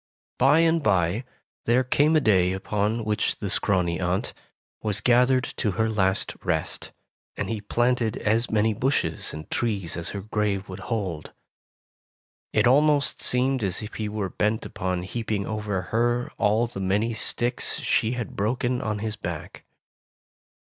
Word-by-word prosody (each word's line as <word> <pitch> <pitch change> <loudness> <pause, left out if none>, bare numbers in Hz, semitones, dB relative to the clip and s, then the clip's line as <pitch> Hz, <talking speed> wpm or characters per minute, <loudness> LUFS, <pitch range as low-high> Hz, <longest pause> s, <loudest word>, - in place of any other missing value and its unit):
Bye 140 +5 +5
and 165 0 +3
bye, 95 - +1 0.4
there 120 +3 +3
came 145 +5 +3
a - - +6
day 95 -8 +3
upon 105 +3 -1
which 105 -1 0
the - - -4
scrawny 90 -4 +1
aunt 90 +1 -1 0.5
was 105 -2 +1
gathered 125 +1 +4
to 105 -5 0
her 110 +4 +1
last 95 -3 0
rest, - - -2 0.5
and - - -2
he 110 -2 -3
planted 120 +1 +1
as 115 +3 +1
many 110 0 +2
bushes 130 +7 -1
and 75 0 -8
trees 100 -8 -1
as 85 0 -4
her 100 - -5
grave 105 -1 -1
would 95 +1 -7
hold. 95 -9 -3 1.2
It - - +3
almost 145 +2 +3
seemed 130 0 +1
as 95 +2 0
if 105 - -8
he 110 -1 -3
were 105 -2 -3
bent 105 +3 0
upon 90 -1 -3
heaping 105 0 -3
over 105 -3 -2
her 120 +1 +1
all 110 +3 +3
the 115 -4 -7
many 105 +5 +1
sticks 120 +2 0
she 110 +2 +1
had 120 -4 -5
broken 120 +4 0
on 110 -1 -2
his 110 -1 -2
back. 85 -6 -7
110 Hz, 155 wpm, -25 LUFS, 100-120 Hz, 1.2 s, a